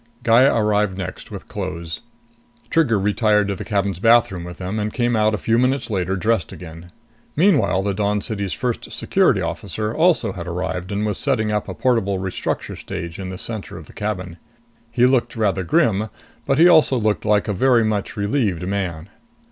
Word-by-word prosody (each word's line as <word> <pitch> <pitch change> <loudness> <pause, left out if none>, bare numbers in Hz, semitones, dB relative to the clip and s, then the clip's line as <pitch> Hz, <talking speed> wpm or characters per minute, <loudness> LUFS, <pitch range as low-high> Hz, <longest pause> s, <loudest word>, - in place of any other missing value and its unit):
Gaya 120 +4 +5
arrived 105 -3 +1
next, 95 -1 -6
with - - -9
clothes. 85 -4 -5 0.7
Trigger 150 - +3
retired 105 +1 +2
to 100 - -1
the - - -6
cabin's 100 -4 -1
bathroom 115 -4 +3
with 90 0 -8
them 95 +4 -4
and 105 0 -2
came 120 0 0
out 110 0 +2
a - - -3
few 115 +4 +1
minutes 130 -1 0
later, 95 -1 -1
dressed 100 -3 0
again. 85 0 -10 0.4
Meanwhile 150 - +3
the 100 0 -1
Dawn 105 +1 0
City's 100 -2 -3
First 125 -2 -3
Security - - +2
Officer 110 0 -3
also 170 +3 +2
had 85 -1 -7
arrived 90 +1 -3
and 105 +1 -1
was 105 - -2
setting 115 -7 0
up 105 -1 -1
a - - -5
portable 115 -7 +1
restructure 95 0 -3
stage 85 +1 -7
in 95 -1 -5
the 95 - -6
center 110 -2 -6
of 80 - -10
the - - -16
cabin. 95 -5 -4 0.5
He 120 +1 +3
looked 125 -2 +2
rather 100 -4 0
grim, 110 - +1 0.4
but 135 - +2
he 170 +3 +7
also 155 -6 +5
looked 110 -2 0
like 105 -1 +2
a 105 - 0
very 120 +3 +3
much 110 0 -2
relieved 100 - 0
man. 90 -4 -3
105 Hz, 185 wpm, -21 LUFS, 95-115 Hz, 0.7 s, he